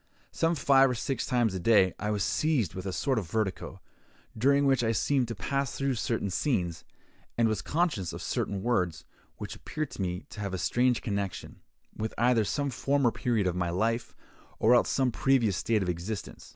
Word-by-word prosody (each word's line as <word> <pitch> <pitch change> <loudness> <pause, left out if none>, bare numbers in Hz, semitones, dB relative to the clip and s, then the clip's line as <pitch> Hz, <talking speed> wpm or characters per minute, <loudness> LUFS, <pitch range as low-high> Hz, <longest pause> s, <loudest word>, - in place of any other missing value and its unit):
Some 165 +1 +1
five 135 -2 +5
or 125 - -1
six 120 +1 -2
times 120 -5 +1
a 95 - -3
day 95 -1 +4
I 105 - -2
was 105 -2 0
seized 140 - +1
with 95 +1 -6
a - - -2
sort 130 +6 0
of 90 -6 -7
vertigo, 95 -2 -3 0.5
during 140 +5 +3
which 135 -3 +3
I 115 0 +1
seemed 130 +3 +1
to 115 - -5
pass 140 +3 -2
through 135 -1 0
certain 115 -4 -2
scenes, 90 - -1 0.5
and 115 -1 +4
was 110 -2 -1
conscious 150 - -1
of - - -7
certain 100 -1 -2
words, 90 -10 0 0.3
which - - -6
appeared 155 0 -5
to - - -6
me 90 0 -2
to - - -9
have 100 -2 -3
a - - -2
strange 120 +7 +1
connection, 100 -3 -4 0.3
with 110 +1 -4
either 120 -1 +3
some 140 +5 -1
former 135 0 +1
period 115 -5 0
of 90 -1 0
my 90 -1 -1
life, 115 +6 -1 0.4
or 115 +3 +4
else 120 - +4
some 130 -2 +1
previous 115 -6 +2
state 110 -1 +1
of 90 - -2
existence. 90 +5 -5
115 Hz, 195 wpm, -29 LUFS, 95-130 Hz, 0.5 s, five